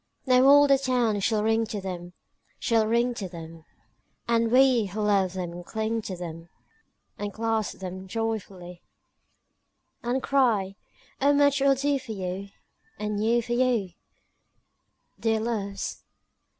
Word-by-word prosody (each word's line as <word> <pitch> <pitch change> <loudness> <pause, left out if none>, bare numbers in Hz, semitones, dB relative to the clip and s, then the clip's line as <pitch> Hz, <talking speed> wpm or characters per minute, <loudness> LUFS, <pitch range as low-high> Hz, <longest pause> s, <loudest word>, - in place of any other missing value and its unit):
II 255 - +3
Now 255 - +5
all 285 +1 +7
the 275 -1 +4
town 245 -5 +1
shall 210 +1 +1
ring 225 +1 +2
to 215 -2 -4
them, 180 -2 -6 0.4
Shall 225 -2 +1
ring 235 +2 +2
to 200 -5 -6
them, 165 -2 -10 0.6
And 230 -1 +2
we 255 -4 +5
who 195 +3 -6
love 200 -3 +2
them 175 -1 -5
cling 220 +4 -2
to 195 -3 -6
them 165 -1 -8 0.7
And 205 0 -3
clasp 225 0 -2
them 185 0 -7
joyfully; 195 -5 -4 1.2
And 245 +2 -1
cry, 225 -8 +2 0.5
"O 285 +1 +4
much 285 -1 +3
we'll 275 0 +4
do 280 +1 0
for 255 -4 -7
you 190 0 -5 0.5
Anew 215 +3 0
for 240 - -3
you, 240 -6 +1 1.3
Dear 225 -1 +1
Loves! 205 -4 -4
220 Hz, 135 wpm, -26 LUFS, 190-240 Hz, 1.3 s, all